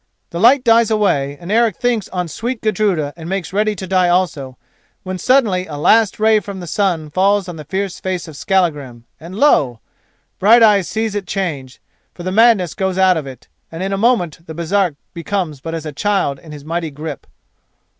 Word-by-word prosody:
The 170 - -4
light 250 +6 +5
dies 230 -1 +4
away, 145 -10 0
and 175 +3 -7
Eric 230 0 +2
thinks 240 -4 -1
on 180 -2 -3
sweet 235 +8 -4
Gudruda 190 -9 0
and 165 0 -9
makes 190 -1 -3
ready 210 +1 +1
to 190 - -6
die 185 -1 +2
also, 155 -8 -1 0.5
when 185 0 -5
suddenly 210 -6 +2
a 150 - -7
last 215 +8 +3
ray 220 0 +4
from 200 -1 -8
the 180 - -7
sun 170 -4 -1
falls 195 +2 +2
on 175 - -6
the 155 - -8
fierce 190 +4 -3
face 185 -2 -4
of 155 - -10
Skallagrim, 145 -10 -1
and 170 +4 -10
lo! 145 - +3 0.6
Brighteyes 210 -2 +5
sees 220 -1 -2
it 205 -2 -4
change, 150 -10 -4 0.4
for 175 - -9
the 185 - -3
madness 215 -5 +4
goes 190 -2 -2
out 190 -1 +4
of 155 -4 -4
it, 130 -1 -11 0.2
and 165 +3 -5
in 195 +1 -2
a - - +1
moment 195 -7 +1
the 160 - -8
Baresark 170 0 0 0.2
becomes 170 -5 -3
but 165 +2 -5
as 160 -1 -6
a 155 - -4
child 145 -3 -1
in 160 - -13
his 145 -1 -10
mighty 165 0 -3
grip. 150 +2 -8
185 Hz, 195 wpm, -17 LUFS, 160-205 Hz, 0.6 s, light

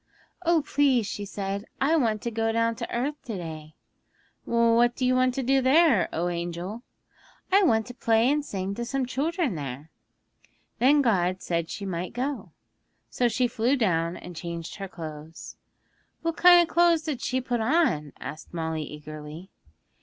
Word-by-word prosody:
'"Oh, 335 -3 +3
please," 270 -6 +2
she 205 0 -5
said, 200 +1 -4
"I 295 +5 +3
want 225 -8 +1
to 235 - -2
go 225 0 0
down 230 0 +1
to - - -5
earth 285 +5 -2
to 225 -5 -4
day." 155 -3 -8 0.7
'"What 235 +1 +3
do 255 - -1
you 255 - +3
want 255 0 +2
to 270 - -1
do 270 +2 +3
there, 265 - +4
O 170 +2 -1
angel?" 175 +5 -4 0.7
'"I 395 +2 +6
want 220 -8 +3
to 245 - -9
play 230 -1 +2
and 295 0 +1
sing 195 -6 -4
to 235 - -4
some 265 +2 -1
children 300 - -1
there." 145 0 -6 0.9
'Then 280 +4 +5
God 185 -5 +1
said 170 -1 -1
she 200 - -5
might 180 -1 -4
go. 265 +3 -3 0.6
So 245 - +2
she 245 +2 +1
flew 240 +3 +1
down 170 -7 0
and 180 -1 -10
changed 170 +1 -6
her 195 -1 -5
clothes 160 -2 -9 0.3
' - - -42
'What 330 0 -1
kind 355 -1 +7
of - - -14
clothes 340 -2 +4
did 295 -6 -3
she 260 - 0
put 245 -2 -2
on?' 220 - +1
asked 160 +2 -8
Molly 160 -1 -2
eagerly. 150 +3 -9
225 Hz, 175 wpm, -26 LUFS, 175-265 Hz, 0.9 s, kind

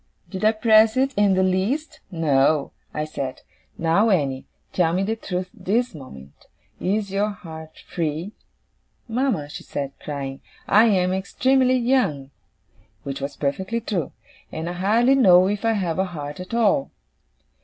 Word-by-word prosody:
Did 190 +1 -5
I 215 - +6
press 220 +1 +4
it 270 +1 +2
in 200 -2 +3
the 190 - +3
least? 195 - -1
No. 150 -4 +2 0.2
I 150 - -3
said, 140 -4 -5 0.3
"Now, 170 +7 +2
Annie, 140 -9 0 0.3
tell 165 -3 +2
me 185 +2 +1
the 220 +3 -1
truth 185 -4 -4
this 240 +5 -1
moment; 70 - -13 0.3
is 200 +1 -1
your 200 +2 +1
heart 160 -5 -10
free?" 165 +3 -3 0.8
"Mama," 230 - -1
she 145 - -8
said 140 -1 -5
crying, 140 -2 -6 0.3
"I 215 +3 +6
am 185 -4 +2
extremely 255 +7 +2
young" 235 - 0 0.7
which 140 0 -5
was 140 +1 -4
perfectly 190 +11 -2
true 195 - -3 0.4
"and 160 +1 -5
I 175 - -3
hardly 220 +8 +3
know 185 -8 +6
if 205 +2 -2
I 225 0 +2
have 185 -5 -1
a 190 - +2
heart 145 -4 -7
at 185 +5 -5
all." 235 +4 +2
185 Hz, 155 wpm, -23 LUFS, 155-220 Hz, 0.8 s, I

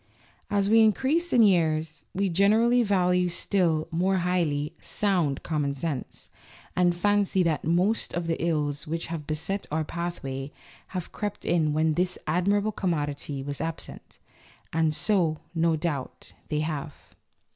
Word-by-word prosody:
As 200 -1 +2
we 225 +2 +5
increase 270 +10 +3
in 235 - +6
years, 160 -5 +2
we 195 +1 +1
generally 215 +7 +4
value 180 -4 +2
still 170 -3 +1
more 185 +3 +1
highly 170 -5 0
"sound 175 -9 0
common 145 -3 -1
sense," 140 -2 -5 0.4
and 175 -1 +3
fancy 200 0 +2
that 165 -3 0
most 180 +7 +1
of 170 -1 -2
the 165 0 -2
ills 150 -2 -1
which 165 +2 -3
have 150 -3 -5
beset 160 +6 -3
our 155 +1 0
pathway 150 -5 -5 0.5
have 180 - -5
crept 205 -1 -5
in 160 -3 +2
when 155 +1 +2
this 180 +3 0
admirable 200 +6 +1
commodity 145 -7 -2
was 140 0 -5
absent. 165 0 -6 0.6
(And 160 -1 +2
so, 175 -7 +2 0.2
no 165 -1 +2
doubt, 150 -4 -4 0.2
they 150 -1 0
have.) 155 -1 -3
170 Hz, 140 wpm, -27 LUFS, 155-195 Hz, 0.6 s, in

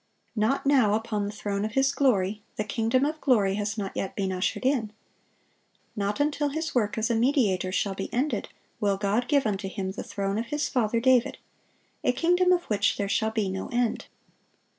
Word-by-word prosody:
Not 220 +7 +1
now 255 -7 +4
"upon 215 -2 -2
the - - -4
throne 205 -1 -3
of 215 0 -3
His 270 +1 +3
glory;" 215 -8 +1
the 210 - -1
kingdom 230 +5 +1
of 305 +1 -3
glory 210 -8 +3
has 205 +1 -2
not 195 -2 -4
yet 195 - -3
been 195 -2 -1
ushered 185 +6 -2
in. 250 -6 +1 1.0
Not 205 +3 -2
until 290 0 +1
His 320 +3 -3
work 210 -4 0
as 220 +1 0
a - - +2
mediator 225 - +2
shall 195 +1 0
be 195 0 -5
ended, 265 +5 -1 0.3
will 200 -2 +1
God 210 +5 0
"give 280 -4 +2
unto 195 -2 -1
Him 190 0 -4
the 195 - -6
throne 200 +1 -2
of 235 - -4
His 295 +3 -1
father 230 -3 +1
David," 255 0 +3 0.7
a 250 - +2
kingdom 355 +6 +3
of 355 -1 +3
which 205 0 +1
"there 200 - -1
shall 220 +2 +1
be 220 -2 -1
no 190 0 -4
end." 240 -1 -1
220 Hz, 195 wpm, -27 LUFS, 200-265 Hz, 1.0 s, now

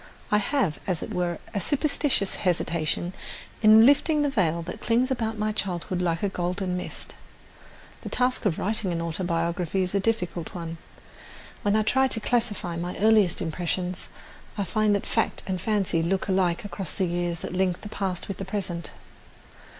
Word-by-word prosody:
I 210 - +5
have, 210 - 0
as 180 -5 0
it - - -6
were, 175 -2 -1 0.2
a 200 - -1
superstitious 280 - +1
hesitation 170 0 0 0.5
in 220 +1 +8
lifting 295 +2 +4
the 290 - +1
veil 170 -8 +1
that 180 - -7
clings 245 +3 +2
about 225 -3 -1
my 215 0 0
childhood 185 -3 -2
like 170 0 0
a - - +3
golden 180 0 -2
mist. 180 - -5 0.9
The - - -6
task 250 -1 +1
of 165 - 0
writing 205 -2 +1
an 170 - -1
autobiography 170 +1 -1
is 185 - -3
a 200 - +3
difficult 190 -6 -2
one. 165 -1 -5 0.8
When 205 0 +2
I 215 - +3
try 265 +5 +3
to 230 - 0
classify 220 -7 0
my 175 +1 -4
earliest 210 -4 +4
impressions, 180 +2 -2 0.5
I 200 - 0
find 210 +2 +2
that 200 - -2
fact - - 0
and 185 -2 -2
fancy 195 -6 +1
look 185 +5 0
alike 185 -2 +1
across 195 -4 -5
the 190 - +1
years 175 -1 -2
that - - -5
link 185 -1 0
the - - -7
past 190 -4 -3
with 195 - -4
the - - -4
present. 185 -4 -3
190 Hz, 175 wpm, -26 LUFS, 175-215 Hz, 0.9 s, in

